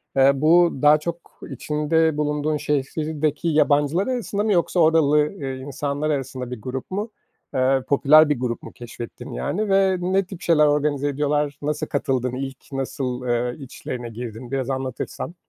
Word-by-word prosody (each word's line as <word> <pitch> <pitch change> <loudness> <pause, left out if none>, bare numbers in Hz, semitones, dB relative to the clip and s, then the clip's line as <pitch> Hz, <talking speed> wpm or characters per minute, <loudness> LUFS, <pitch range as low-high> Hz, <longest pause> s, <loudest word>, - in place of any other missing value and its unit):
Eee, 135 +1 +6
bu 165 +5 +4
daha 150 +1 +6
çok 170 +2 -7
içinde 155 +1 0
bulunduğun 150 0 0
şehirdeki 150 +2 -1
yabancılar 150 - +2
arasında 235 -5 -2
mı 215 -2 +2
yoksa 175 +1 +1
oralı, 155 -2 +4
eee, 135 -7 -5
insanlar 140 +3 -3
arasında 130 -3 -3
bir 125 - -6
grup 130 - -6
mu? 205 +4 -3 0.4
Eee, 130 0 +2
popüler 150 +2 +6
bir 145 -5 0
grup 120 -2 -3
mu - - -9
keşfettin, 120 -1 -9
yani, 195 - -2
ve 195 -1 +3
ne 185 +2 +1
tip 190 -1 -10
şeyler 160 -4 +4
organize 145 -1 +1
ediyorlar? 145 0 -1
Nasıl 150 +1 -2
katıldın? 130 -3 -1
İlk 135 0 -5
nasıl, 130 -2 -3
eee, 120 +3 -1
içlerine 125 -2 -6
girdin? 120 +1 -8
Biraz 135 -1 -2
anlatırsan. 130 +5 -4
145 Hz, 155 wpm, -23 LUFS, 130-160 Hz, 0.4 s, Eee